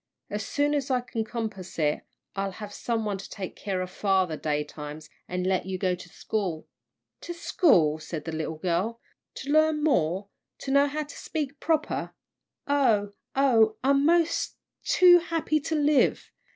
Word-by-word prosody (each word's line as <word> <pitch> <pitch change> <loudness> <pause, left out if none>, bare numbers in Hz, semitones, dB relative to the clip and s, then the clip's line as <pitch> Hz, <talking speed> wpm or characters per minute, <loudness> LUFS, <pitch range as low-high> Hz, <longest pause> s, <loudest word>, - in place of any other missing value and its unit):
As 210 0 -2
soon 290 +5 0
as 280 -2 -1
I 255 -1 +2
can 235 -2 -3
compass 220 -5 -5
it, 150 -2 +1 0.3
I'll 195 -1 -2
have 205 +1 -8
some 225 -1 -2
one 200 -2 -2
to - - -9
take 190 -3 -6
care 190 -2 -3
of 180 - -8
father 190 -5 +1
daytimes, 150 0 -4 0.2
and 180 0 -2
let 185 0 0
you 190 -1 -2
go 185 -1 +1
to 180 0 -8
school." 185 -8 -3 0.5
"To 345 - -6
school!" 170 - +3
said 155 -1 -6
the 165 - -3
little 160 0 -3
girl, 185 +8 -1 0.4
"to 275 - -5
learn 310 0 +3
more 190 - +1 0.3
to 270 - -3
know 280 +1 +5
how 305 +2 -2
to 290 - -11
speak 290 -3 -4
proper! 315 -1 -1 0.5
Oh, 230 -8 +2 0.2
oh, 225 -6 +4
I'm 275 +1 +4
mos' 335 0 +2 0.3
too 355 -1 +7
happy 330 -2 0
to 320 +2 -2
live! 295 -1 +2
220 Hz, 165 wpm, -27 LUFS, 180-285 Hz, 0.5 s, too